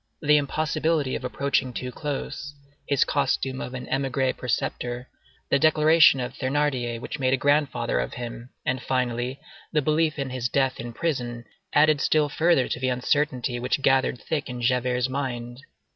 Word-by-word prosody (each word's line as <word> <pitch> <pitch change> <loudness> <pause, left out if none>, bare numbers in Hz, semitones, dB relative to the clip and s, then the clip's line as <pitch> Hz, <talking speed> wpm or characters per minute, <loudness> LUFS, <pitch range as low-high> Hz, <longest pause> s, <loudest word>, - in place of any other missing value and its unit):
The 150 -1 +4
impossibility 155 0 0
of - - -5
approaching 130 0 0
too 125 +1 -4
close, 145 +1 -5 0.3
his 140 -2 +3
costume 135 -1 0
of 125 - -5
an 125 - -6
émigré 135 -1 0
preceptor, 125 +1 -3 0.4
the - - +4
declaration 155 -1 +6
of 125 0 -3
Thénardier 130 -3 -1
which 145 - -6
made 130 -1 +2
a - - +3
grandfather 145 - +1
of - - -3
him, 120 0 -7 0.2
and, 130 -1 0
finally, 125 0 -1 0.3
the 150 -2 +1
belief 155 +1 +1
in 135 -2 -3
his 125 -1 -2
death 135 -1 +1
in 120 0 -5
prison, 120 -5 -3 0.3
added 150 0 +4
still 150 -1 +2
further 160 -3 +3
to - - -3
the 130 0 0
uncertainty 125 -1 0
which 125 +2 -1
gathered 130 -2 +3
thick 145 +5 -3
in 125 0 -5
Javert's 125 0 +1
mind. 125 -2 -4
130 Hz, 160 wpm, -25 LUFS, 125-145 Hz, 0.4 s, declaration